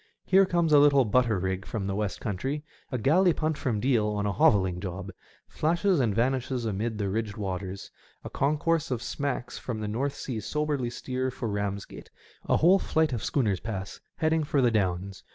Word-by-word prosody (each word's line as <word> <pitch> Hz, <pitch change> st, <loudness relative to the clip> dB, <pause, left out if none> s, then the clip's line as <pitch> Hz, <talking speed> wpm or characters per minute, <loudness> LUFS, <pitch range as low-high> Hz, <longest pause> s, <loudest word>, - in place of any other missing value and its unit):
Here 195 Hz, 0 st, +5 dB
comes 170 Hz, -3 st, +2 dB
a 145 Hz, -, +8 dB
little 140 Hz, -2 st, +5 dB
butter 115 Hz, 0 st, +2 dB
rig 95 Hz, +1 st, -2 dB
from 105 Hz, -1 st, -4 dB
the 95 Hz, -, -2 dB
West 105 Hz, -1 st, -2 dB
country; 135 Hz, +8 st, -3 dB, 0.3 s
a 125 Hz, -, -1 dB
galley 170 Hz, -, +4 dB
punt 155 Hz, 0 st, -1 dB
from 120 Hz, -7 st, -1 dB
Deal 120 Hz, -3 st, +2 dB
on 105 Hz, 0 st, -1 dB
a 100 Hz, -, +1 dB
hovelling 95 Hz, -2 st, +3 dB
job, 95 Hz, +1 st, -5 dB, 0.4 s
flashes 175 Hz, +3 st, +1 dB
and 115 Hz, -6 st, +1 dB
vanishes 125 Hz, +1 st, 0 dB
amid 110 Hz, +1 st, -2 dB
the 100 Hz, -2 st, -1 dB
ridged 105 Hz, +2 st, -2 dB
waters; 95 Hz, -1 st, -5 dB, 0.3 s
a -, -, -6 dB
concourse 155 Hz, +3 st, +1 dB
of 120 Hz, -3 st, -2 dB
sinacks 140 Hz, -4 st, -3 dB
from 115 Hz, -4 st, -4 dB
the 105 Hz, -, -3 dB
North 130 Hz, +7 st, -2 dB
Sea 120 Hz, -5 st, -4 dB
soberly 150 Hz, -1 st, -1 dB
steer 130 Hz, +1 st, -3 dB
for 125 Hz, -2 st, -5 dB
Bamsgate; 100 Hz, -1 st, -4 dB, 0.4 s
a -, -, +3 dB
whole 180 Hz, +5 st, +5 dB
flight 160 Hz, -6 st, +1 dB
of 115 Hz, -, -3 dB
schooners 105 Hz, -10 st, +1 dB
pass, 100 Hz, -3 st, -5 dB, 0.2 s
heading 160 Hz, 0 st, +1 dB
for 145 Hz, -1 st, 0 dB
the 125 Hz, -3 st, +4 dB
Downs. 95 Hz, -2 st, -1 dB
120 Hz, 190 wpm, -27 LUFS, 100-145 Hz, 0.4 s, a